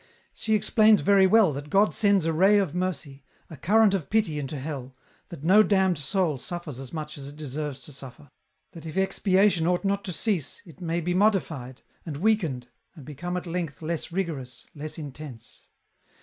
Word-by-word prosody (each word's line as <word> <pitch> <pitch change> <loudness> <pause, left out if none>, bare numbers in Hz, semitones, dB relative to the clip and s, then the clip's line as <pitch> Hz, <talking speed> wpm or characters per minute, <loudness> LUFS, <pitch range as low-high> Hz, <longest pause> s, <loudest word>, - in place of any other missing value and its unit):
She 220 - 0
explains 215 0 +4
very 195 -1 +5
well 195 -5 +5
that 145 +2 -7
God 200 +4 +3
sends 200 -5 +2
a 165 - +1
ray 195 +6 +5
of 195 -7 0
mercy, 150 -7 -4 0.3
a - - -7
current 205 +8 +3
of 175 -8 -2
pity 200 -9 +1
into 145 +1 -5
hell, 135 -2 -6 0.3
that 165 -5 -10
no 190 +6 +6
damned 190 -5 +2
soul 155 -1 0
suffers 165 -4 -6
as 135 -2 -8
much 155 -2 -6
as 135 - -6
it 145 - -9
deserves 150 -1 -5
to 145 +4 -9
suffer; 135 +1 -11 0.4
that 165 -1 -10
if 160 - -7
expiation 190 -2 +2
ought 180 +2 0
not 200 0 0
to 185 - -3
cease, 175 -4 -2
it 175 +1 -15
may 170 0 -1
be 175 +2 -1
modified, 160 - 0 0.2
and 155 -4 -6
weakened, 165 - 0 0.3
and 150 -6 -12
become 175 +5 -5
at 180 - -5
length 165 -3 -4
less 165 +1 -3
rigorous, 150 -9 -4
less 155 0 -7
intense. 145 -5 -10
165 Hz, 185 wpm, -26 LUFS, 145-195 Hz, 0.4 s, no